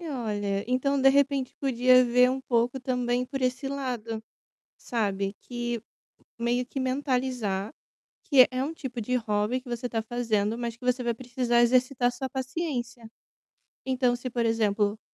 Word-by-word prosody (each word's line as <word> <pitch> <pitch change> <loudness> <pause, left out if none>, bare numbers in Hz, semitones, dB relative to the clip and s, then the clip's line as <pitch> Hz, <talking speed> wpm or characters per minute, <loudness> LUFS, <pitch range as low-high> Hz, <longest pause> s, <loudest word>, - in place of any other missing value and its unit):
E 335 - -6
olha, 205 -6 -2
então, 275 +2 +1
de 270 - +7
repente, 275 -1 +2
podia 255 -1 +5
ver 250 +1 +4
um 265 +1 -2
pouco 245 +1 0
também 250 -1 -1
por 270 -1 -4
esse 255 +1 0
lado, 245 -5 -4 0.6
sabe, 200 -4 -2
que 240 -1 -3 0.6
meio 240 +1 0
que 270 - -5
mentalizar, 255 -6 -1 0.5
que 265 -4 +6
é 255 +1 -1
um 310 +4 -3
tipo 255 -6 -6
de 250 +3 -1
hobby 220 +2 0
que 250 - -13
você 240 +1 -4
está 225 -2 -1
fazendo, 225 -2 -1
mas 235 -1 -3
que 240 - -19
você 250 0 +1
vai 235 -1 0
precisar 240 0 +1
exercitar 250 0 +3
sua 265 +1 -4
paciência. 255 -4 -4 0.8
Então 255 -2 +1
se, 250 +1 -6
por 235 -1 0
exemplo, 215 -2 +1
245 Hz, 160 wpm, -27 LUFS, 230-260 Hz, 0.8 s, de